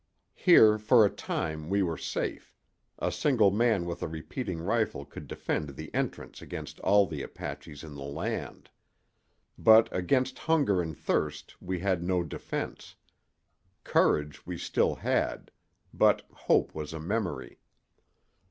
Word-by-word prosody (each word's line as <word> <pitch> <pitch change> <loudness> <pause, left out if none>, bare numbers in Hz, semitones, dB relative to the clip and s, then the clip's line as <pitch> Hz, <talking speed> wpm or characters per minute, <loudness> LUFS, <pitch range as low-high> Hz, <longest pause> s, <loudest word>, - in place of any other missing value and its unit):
Here 110 - +6
for 110 +1 +6
a 100 - +1
time 80 0 -4
we 100 0 +2
were 85 -3 -1
safe: - - -4 0.4
a - - -1
single 115 -9 +3
man 110 -3 +2
with 85 0 -5
a - - -2
repeating 80 - -5
rifle 100 - -1
could 70 - -10
defend 75 -3 -3
the 80 +2 -9
entrance - - -3
against - - -8
all 100 +1 +4
the 75 -6 -5
Apaches 75 +1 -8
in 80 -2 -9
the 70 - -9
land. 70 +1 -5 0.9
But 110 0 +7
against 125 +9 +1
hunger 145 - +2
and 80 -3 -5
thirst 75 0 -2
we 90 0 -3
had 95 -3 +1
no 90 0 0
defense. 80 - -6 0.9
Courage 75 -1 +1
we - - -6
still - - +1
had, - - -1 0.4
but - - +3
hope - - +1
was 75 0 -6
a 80 - -5
memory. 90 - -3
90 Hz, 140 wpm, -29 LUFS, 80-110 Hz, 0.9 s, But